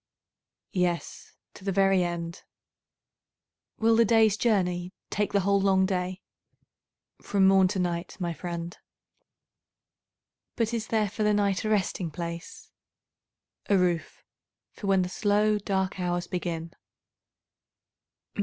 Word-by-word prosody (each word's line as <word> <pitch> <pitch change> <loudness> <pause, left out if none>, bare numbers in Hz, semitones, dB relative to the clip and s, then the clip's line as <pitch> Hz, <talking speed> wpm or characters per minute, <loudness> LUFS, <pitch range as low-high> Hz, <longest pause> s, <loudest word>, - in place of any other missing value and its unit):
Yes, 180 -2 -2 0.2
to - - -14
the 195 - -1
very 195 -1 +3
end. 170 0 -4 1.4
Will 225 0 +3
the 230 - +6
day's 220 -2 +4
journey 180 -5 0 0.2
take 210 0 0
the 200 - +2
whole 200 +1 +2
long 190 -1 +3
day? 185 0 -2 1.0
From 195 -2 +3
morn 190 -1 +5
to 190 - -3
night, 175 -1 -2
my 175 -2 -2
friend. 170 +1 -5 1.8
But 230 -1 0
is 220 -2 -2
there 215 -2 +1
for 210 +3 -6
the 210 0 +3
night 200 -2 +1
a - - 0
resting 195 -4 0
place? 170 +2 -7 1.0
A 200 - +5
roof 175 -3 -1 0.5
for 205 - -7
when 190 -1 +3
the - - -2
slow 210 +2 +1
dark 190 -1 -1
hours 175 0 -1
begin. 170 -2 -4
190 Hz, 125 wpm, -27 LUFS, 175-205 Hz, 1.8 s, the